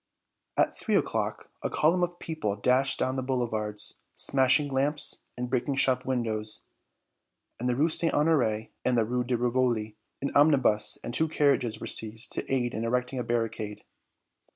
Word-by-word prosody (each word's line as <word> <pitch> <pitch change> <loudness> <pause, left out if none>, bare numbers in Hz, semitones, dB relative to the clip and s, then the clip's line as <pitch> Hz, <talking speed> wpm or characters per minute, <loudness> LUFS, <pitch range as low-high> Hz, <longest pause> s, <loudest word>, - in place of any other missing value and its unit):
At - - +2
three - - -1
o'clock - - -1
a - - -2
column 170 +4 +2
of 175 - +2
the 175 - -22
people 155 -13 -3
dashed 130 +6 +2
down 130 +1 -1
the - - 0
boulevards, 110 -5 -1 0.2
smashing 135 +2 +3
lamps 145 +3 +1 0.2
and 125 0 -3
breaking 130 +2 -1
shop 130 -2 +1
windows. 110 -4 -2 0.9
In 125 - -2
the 125 - +1
Rue 150 +5 +3
St. 165 0 +1
Honoré 125 -8 +1
and 125 -1 +2
the 115 - +3
Rue 125 +2 -1
de 125 0 -1
Rivoli 120 -3 0 0.2
an 140 - -2
omnibus 135 -8 +4
and 120 - -5
two 160 +5 +2
carriages 140 -7 +1
were - - -6
seized 110 +1 0
to - - -4
aid 125 -2 0
in 110 - -3
erecting 125 +2 -1
a - - -1
barricade. 115 -3 -3
125 Hz, 170 wpm, -28 LUFS, 115-135 Hz, 0.9 s, omnibus